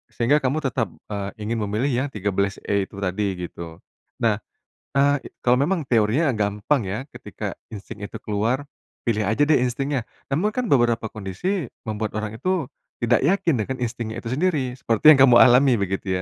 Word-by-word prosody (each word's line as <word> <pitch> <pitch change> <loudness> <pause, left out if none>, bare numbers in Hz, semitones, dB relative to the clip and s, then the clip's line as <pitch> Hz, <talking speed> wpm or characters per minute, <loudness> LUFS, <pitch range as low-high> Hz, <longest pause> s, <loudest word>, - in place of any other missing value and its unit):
sehingga 125 +6 +3
kamu 135 +2 0
tetap, 125 -5 0 0.2
eee, 100 -1 -3
ingin 115 +2 -2
memilih 110 +8 0
yang - - -3
13E 100 -1 -1
itu - - -15
tadi, 95 +1 -1
gitu. 85 -1 -9 0.5
Nah, 110 -2 +2 0.6
eee, 140 0 +3 0.2
kalau 125 0 +5
memang 170 +1 0
teorinya 120 +6 +2
gampang 105 +5 0
ya, 105 +4 -2
ketika - - -6 0.2
insting 105 0 -9
itu 100 - -6
keluar, 115 +7 -1 0.4
pilih 110 -2 +1
aja 130 +7 +3
deh 155 - +5
instingnya. 135 +2 -1 0.3
Namun 185 +9 +2
kan 250 +3 -2
beberapa 120 - +2
kondisi, 115 - -3 0.2
membuat 110 0 -2
orang 110 0 -4
itu 185 -1 0 0.3
tidak 120 +1 +2
yakin 165 -1 +2
dengan 130 +4 -4
instingnya 115 -1 -4
itu 115 - -8
sendiri, 145 -5 0
seperti 125 +5 +5
yang - - -1
kamu 125 -3 +8
alami, 125 0 +6
begitu 95 0 -2
120 Hz, 165 wpm, -23 LUFS, 105-140 Hz, 0.6 s, kamu